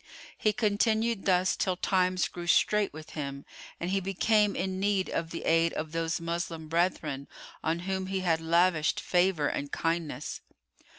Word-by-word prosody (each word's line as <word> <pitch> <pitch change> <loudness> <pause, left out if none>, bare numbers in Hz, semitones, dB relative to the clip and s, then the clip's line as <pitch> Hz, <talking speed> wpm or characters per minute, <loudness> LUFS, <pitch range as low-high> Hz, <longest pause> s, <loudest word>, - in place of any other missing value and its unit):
He 215 - +2
continued 220 0 +1
thus 185 -1 +3
till 185 -2 0
times 185 -1 +1
grew 175 -1 -8
strait 210 +3 +3
with 155 +1 -10
him 140 -2 -5 0.3
and 175 +2 -2
he 195 - +2
became 200 +2 +2
in 190 0 -2
need 195 -1 +1
of 165 -1 -2
the 165 - -6
aid 165 0 +3
of 155 0 -4
those 165 0 -1
Moslem 170 -1 -4
brethren 155 -4 -1 0.4
on 165 +2 0
whom 190 +1 -2
he 190 0 -2
had 165 -3 +1
lavished 165 -1 +2
favour 180 -4 +2
and 140 0 -3
kindness. 165 -1 -2
175 Hz, 160 wpm, -29 LUFS, 165-190 Hz, 0.4 s, thus